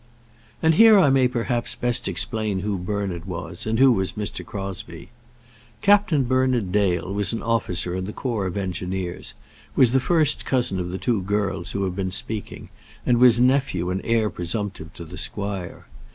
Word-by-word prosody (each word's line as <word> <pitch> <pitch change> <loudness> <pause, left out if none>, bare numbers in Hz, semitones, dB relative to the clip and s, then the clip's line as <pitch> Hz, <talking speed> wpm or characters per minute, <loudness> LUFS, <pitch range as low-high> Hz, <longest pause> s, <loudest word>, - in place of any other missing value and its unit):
And 160 0 +5
here 220 +4 +7
I 150 -8 +5
may 130 -1 +4
perhaps 120 -1 -2
best 120 0 0
explain 100 +1 -2
who 100 -1 -2
Bernard 95 -2 -3
was, 90 +2 -6
and 110 +1 0
who 135 +1 +6
was 95 -5 0
Mr. 105 -1 -4
Crosbie. 100 0 -7 0.7
Captain 200 -8 +4
Bernard 130 -5 +1
Dale 95 -2 0
was 105 +2 +1
an 115 - -4
officer 95 -6 -1
in 95 0 -3
the 105 - -5
corps 110 -5 -2
of 90 - -5
Engineers, 95 -1 -4 0.4
was 125 -3 +5
the 135 - +3
first 155 0 +2
cousin 120 -8 0
of 90 -1 -3
the 90 - -4
two 115 -1 0
girls 100 -2 -2
who 100 - -1
have 95 -2 -2
been 95 -1 -2
speaking, 110 +1 -4 0.3
and 120 -1 +3
was 120 -2 +7
nephew 130 -7 +2
and 95 - -2
heir 115 -3 +1
presumptive 90 -1 -4
to 85 - -8
the 80 - -9
squire. 100 -3 -4
105 Hz, 175 wpm, -23 LUFS, 95-125 Hz, 0.7 s, here